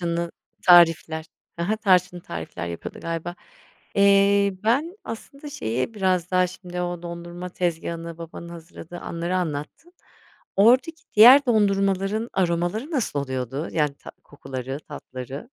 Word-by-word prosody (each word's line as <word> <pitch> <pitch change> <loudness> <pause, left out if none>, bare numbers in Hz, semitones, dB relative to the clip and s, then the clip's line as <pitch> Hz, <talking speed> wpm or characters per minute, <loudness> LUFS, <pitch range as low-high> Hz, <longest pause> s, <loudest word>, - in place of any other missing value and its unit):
Tarçınlı 170 0 -2 0.4
tarifler, 165 -2 +5 0.3
hı 170 - -1
hı, 215 +4 0
tarçınlı 180 -4 +2
tarifler 85 - -6
yapıyordu 85 -1 -7
galiba. 165 +1 -4 0.6
Eee, 200 0 +4
ben 295 - +1
aslında 275 +6 -8
şeyi 130 - -3
biraz 185 -3 0
daha 185 0 +3
şimdi 180 0 -7
o 175 -1 -3
dondurma 175 +1 -7
tezgâhını 170 -1 -3
babanın 170 0 -9
hazırladığı 170 0 -10
anları 170 +2 -3
anlattın. 160 - -4 0.6
Oradaki 255 +10 +4
diğer 255 +6 +9
dondurmaların 200 -1 +1
aromaları 175 - -1
nasıl 245 - -1
oluyordu, 130 +2 -4
yani 150 -3 +1
ta - - -12
kokuları 135 -2 -6
tatları? 130 - -8
175 Hz, 125 wpm, -24 LUFS, 165-200 Hz, 0.6 s, diğer